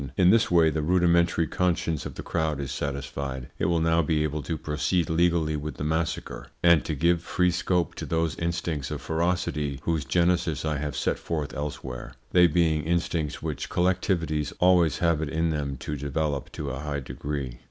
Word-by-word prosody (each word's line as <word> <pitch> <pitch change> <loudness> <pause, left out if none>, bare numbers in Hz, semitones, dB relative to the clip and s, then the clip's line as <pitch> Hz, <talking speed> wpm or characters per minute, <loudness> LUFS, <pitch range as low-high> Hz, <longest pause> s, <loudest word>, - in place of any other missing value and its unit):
In 90 -1 +6
this 115 0 +4
way 85 -2 +5
the 80 - -1
rudimentary 85 0 +3
conscience 85 -2 0
of - - -10
the - - -6
crowd 80 -3 -1
is 70 -2 -4
satisfied. 70 -2 -4
It - - +1
will 85 -1 +2
now 80 +1 +3
be 75 -1 +1
able 75 0 -2
to 80 +3 -3
proceed 80 +3 0
legally 85 -2 +2
with 75 -1 -4
the - - -4
massacre, 80 +2 -2 0.2
and 85 -2 +6
to 80 - -2
give 85 +3 +2
free 90 +1 +1
scope 90 -1 0
to - - -5
those 80 -1 0
instincts 85 -4 -2
of 75 - -4
ferocity 80 -3 -1
whose 80 -3 0
genesis 85 -1 +1
I 75 -1 0
have 75 +1 -3
set - - 0
forth 75 -4 -3
elsewhere, 65 -4 -5 0.2
they 90 -1 +6
being 80 -2 +2
instincts 85 -2 -1
which - - -4
collectivities 90 -4 0
always 90 -3 +4
have 85 -3 +2
it 80 - -2
in 80 +1 0
them 70 -3 -2
to 75 - -3
develop 70 0 -2
to 70 -2 -4
a 70 - -5
high 70 -1 -3
degree. 65 -2 -5
80 Hz, 185 wpm, -26 LUFS, 75-85 Hz, 0.2 s, In